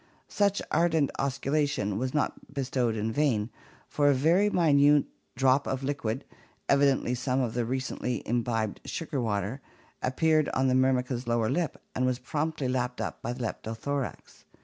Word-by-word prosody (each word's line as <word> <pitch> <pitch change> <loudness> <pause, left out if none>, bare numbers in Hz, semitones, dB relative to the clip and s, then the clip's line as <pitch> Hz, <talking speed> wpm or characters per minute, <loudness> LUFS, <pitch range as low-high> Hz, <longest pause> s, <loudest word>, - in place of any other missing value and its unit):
Such 200 -1 +1
ardent 160 -4 +2
osculation 140 -6 0
was 130 +1 -1
not 150 -1 -2
bestowed 130 -4 -1
in 110 +1 -1
vain, 115 -5 +1 0.4
for 145 -1 +2
a 140 - +4
very 170 +10 +3
minute 145 -5 +4 0.3
drop 135 +2 +3
of 135 0 -2
liquid 135 -3 -2 0.2
— - - -37
evidently 140 -3 +3
some 130 +1 0
of 120 -4 -1
the 120 -1 0
recently 125 0 -2
imbibed 115 -2 -1
sugar 150 -5 -3
water 105 +3 -2 0.2
— - - -32
appeared 155 +4 +2
on 130 0 +2
the - - +2
Myrmica's 130 -1 +1
lower 115 -2 +1
lip 170 -5 -1
and 130 0 +1
was 130 -1 0
promptly 150 0 -2
lapped 125 -1 -1
up - - -4
by - - -3
the 125 0 -5
Leptothorax. 120 +5 -4
130 Hz, 160 wpm, -28 LUFS, 120-145 Hz, 0.4 s, a